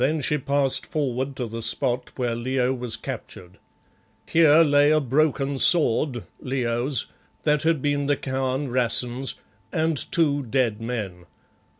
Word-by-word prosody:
Then 155 +3 +1
she 150 +2 0
passed 135 -1 0
forward 135 -2 -2
to 125 - -3
the 115 0 -6
spot 125 +2 -1
where 120 -2 -1
Leo 125 +2 -1
was 120 -3 -3
captured. 90 -3 -9 0.7
Here 160 0 +5
lay 145 -1 +4
a 155 0 +4
broken 140 0 0
sword 135 -6 +3 0.2
Leo's 125 0 -1 0.4
that 150 -1 +2
had 160 -4 0
been 145 -1 0
the 145 - +2
Khan 130 +1 -2
Rassen's, 125 +1 +1 0.4
and 160 0 0 0.2
two 145 -4 +2
dead 120 -4 -1
men. 100 -7 -5
130 Hz, 135 wpm, -24 LUFS, 120-145 Hz, 0.7 s, Here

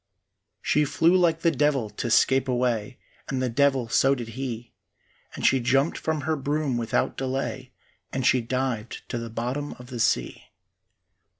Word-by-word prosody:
She 150 - +3
flew 165 +5 +3
like 170 -3 +3
the 170 - +3
devil 140 -5 +1
to 110 +3 -4
scape 130 +3 +3
away, 125 -1 -1 0.3
And 135 - -1
the 130 -1 0
devil 135 -1 +2
so 135 +4 +3
did 120 -3 -6
he, 120 -1 -6 0.6
And - - -4
she 135 - +5
jumped 135 +5 +2
from 160 -2 -2
her 160 +1 0
broom 145 -1 -1
without 115 -1 0
delay 130 0 -3 0.4
And 130 -1 -2
she 130 - +4
dived 120 -2 -3
to 120 - -2
the 115 0 -6
bottom 125 +6 -3
of 125 +1 -13
the 120 - -5
sea. 60 - 0
130 Hz, 165 wpm, -25 LUFS, 120-140 Hz, 0.6 s, she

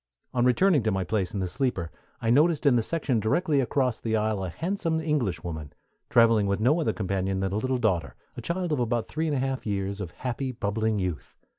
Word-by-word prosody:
On 120 - +2
returning 150 +5 +4
to 110 0 0
my 95 -1 0
place 95 0 -1
in 100 -3 -3
the 95 - -1
sleeper 90 - -2 0.3
I 115 - +1
noticed 155 +4 +3
in 140 -3 +5
the 120 - +3
section 135 -2 0
directly 145 - +1
across 125 -1 0
the 110 -1 -1
aisle 110 -2 0
a 95 - -3
handsome 165 - -1
Englishwoman, 90 - -2 0.4
traveling 115 -3 +5
with 100 0 0
no 140 +10 +3
other - - +1
companion 95 -1 -1
than 95 0 -1
a - - 0
little 130 +3 0
daughter, 95 - 0 0.2
a - - -6
child 175 0 -2
of 150 - +1
about 120 -1 0
three 160 +1 -2
and 150 - 0
a - - 0
half 135 -2 -2
years 100 0 -2
of 90 - -4
happy, 130 +7 -4
bubbling 110 -1 -1
youth. 90 -5 -4
115 Hz, 220 wpm, -27 LUFS, 100-140 Hz, 0.4 s, in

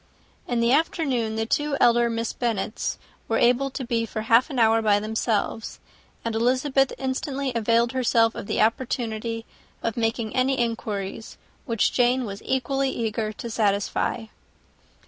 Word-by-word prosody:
In 240 -1 0
the 235 +1 +3
afternoon, 265 -7 +1
the 225 0 -1
two 295 +4 0
elder 235 0 +4
Miss 230 0 -2
Bennets 225 -3 -2 0.3
were - - +1
able 250 +3 +3
to 265 0 -5
be 235 -1 0
for 220 - -4
half 230 +5 +4
an 275 - -5
hour 225 -1 +4
by 210 -2 +3
themselves; 220 0 -2 0.5
and 230 - -1
Elizabeth 260 +4 +2
instantly 265 +1 -2
availed 230 +1 +2
herself 235 -3 +2
of 200 - -7
the - - 0
opportunity 225 -1 -1 0.4
of 230 - -1
making 225 -1 -1
any 260 +1 +2
inquiries 220 -3 -3 0.3
which 230 -3 +1
Jane 250 +1 +2
was 200 -1 -7
equally 270 +1 0
eager 220 -3 -2
to 235 - -7
satisfy. 205 +1 0
235 Hz, 145 wpm, -24 LUFS, 220-255 Hz, 0.5 s, elder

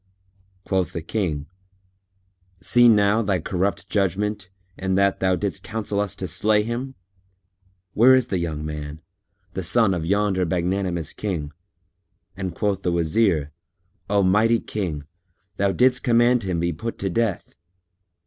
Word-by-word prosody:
Quoth 95 -4 -1
the 85 - -4
King 85 -7 -2 1.1
"See 120 +7 +5
now 105 0 +4
thy 100 -3 +1
corrupt 95 +4 -2
judgment, 100 0 -1 0.3
in 95 0 -1
that 100 0 +2
thou 95 -1 +2
didst 95 -3 -3
counsel 110 -2 -3
us 100 -1 -1
to 95 -2 -4
slay 105 +5 +2
him! 125 +4 -4 1.0
Where 130 +4 +6
is 130 -2 +2
the 95 -7 -2
young 80 -3 -3
man, 75 0 -6 0.5
the 95 - -4
son 105 +3 +3
of 85 -3 -2
yonder 100 +1 +1
magnanimous 90 -1 -1
King?" 85 -8 -4 0.8
And 95 -3 -5
quoth 100 -2 -1
the 90 - 0
Wazir, 85 -2 +1 0.6
"O 100 -1 +3
mighty 110 +5 +3
King, 85 -9 -4 0.5
thou 100 0 +2
didst 125 +4 +3
command 120 +1 +3
him 90 -4 -2
be 85 0 0
put 115 +10 -5
to 95 - -2
death." 115 -2 -1
95 Hz, 140 wpm, -23 LUFS, 85-105 Hz, 1.1 s, Where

